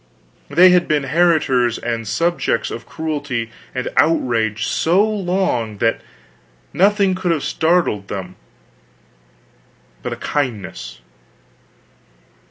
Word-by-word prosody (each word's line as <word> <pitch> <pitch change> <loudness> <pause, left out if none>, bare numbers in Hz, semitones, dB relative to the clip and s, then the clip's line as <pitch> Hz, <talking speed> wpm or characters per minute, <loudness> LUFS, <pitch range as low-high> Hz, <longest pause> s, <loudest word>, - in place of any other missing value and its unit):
They 175 +6 +6
had 180 -1 +3
been 150 -2 +1
heritors 135 -6 +2
and 115 -2 -4
subjects 170 -2 0
of 115 - -7
cruelty 145 -8 -3 0.2
and 125 - -2
outrage 115 -9 +2
so 185 +6 +2
long 180 - -1
that 115 +2 0 0.7
nothing 200 +1 +3
could 185 -1 -2
have 160 -4 0
startled 160 - +1
them 95 -3 -6 1.7
but - - -4
a - - -4
kindness. 105 - -4
145 Hz, 100 wpm, -19 LUFS, 115-175 Hz, 1.7 s, They